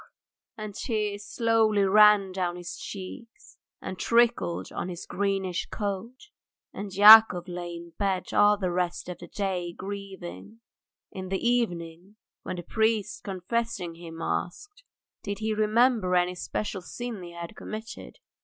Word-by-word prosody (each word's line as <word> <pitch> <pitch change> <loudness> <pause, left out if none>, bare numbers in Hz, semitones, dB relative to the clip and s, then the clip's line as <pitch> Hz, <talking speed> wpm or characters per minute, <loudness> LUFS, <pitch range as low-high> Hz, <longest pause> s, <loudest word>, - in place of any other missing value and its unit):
and 215 -1 -6
tears 210 -2 -2
slowly 225 -3 +2
ran 205 0 +6
down 180 -2 -2
his 175 -1 -7
cheeks 220 +5 -10 0.2
and 185 -1 -6
trickled 230 - +2
on 180 - -4
his 175 -1 -7
greenish 195 -2 -2
coat. 225 - -5 0.4
And 200 0 -6
Yakov 205 -2 +8
lay 175 -1 -6
in 170 0 -10
bed 195 -3 -1
all 205 0 +5
the 185 -3 -1
rest 175 0 -2
of 180 - -7
the - - -10
day 185 -4 -3
grieving. 195 - -8 0.5
In 185 -1 -7
the 190 - 0
evening, 180 -5 -2 0.3
when - - -5
the 175 - -6
priest 220 +2 0
confessing 195 -2 -3
him 165 -1 -9
asked, 400 - -4 0.4
Did 200 -1 -4
he 220 0 -1
remember 215 -2 +2
any 180 0 +2
special 190 +2 -4
sin 230 +3 -6
he 175 -1 -9
had 170 +5 -8
committed? 220 +1 -8
195 Hz, 140 wpm, -27 LUFS, 180-220 Hz, 0.5 s, Yakov